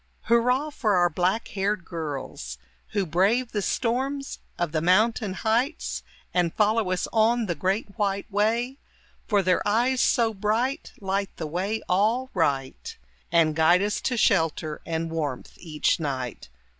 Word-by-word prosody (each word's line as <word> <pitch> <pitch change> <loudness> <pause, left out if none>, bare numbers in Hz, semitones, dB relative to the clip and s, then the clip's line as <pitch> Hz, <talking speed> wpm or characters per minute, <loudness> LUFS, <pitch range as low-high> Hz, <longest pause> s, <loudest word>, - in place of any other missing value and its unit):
Hurrah 250 +6 +2
for 215 -8 +1
our 175 -1 +3
black 185 +7 0
haired 200 -3 -1
girls, 140 - -5 0.4
Who 200 -2 +1
brave 200 +9 +2
the 205 - -1
storms 265 +6 -1 0.2
of 175 -3 -1
the 155 -1 0
mountain 210 +4 +2
heights 235 - -1 0.3
And 175 -2 +1
follow 215 -1 +2
us 185 -1 -1
on 230 +1 +3
the 175 - -1
great 195 +6 -2
white 200 -1 0
way; 230 +6 0 0.5
For 205 -3 +2
their 180 0 +2
eyes 245 +5 +2
so 230 -2 +3
bright 220 +6 -1
light 195 0 -1
the 160 - -4
way 190 +8 -2
all 225 +8 +1
right 140 -7 -1 0.3
And 165 -2 +3
guide 175 +4 +4
us 210 0 -1
to 250 - -1
shelter 160 -5 +1
and 165 0 -2
warmth 150 -6 -3
each 155 -2 0
night. 130 - -4
200 Hz, 145 wpm, -25 LUFS, 165-230 Hz, 0.5 s, guide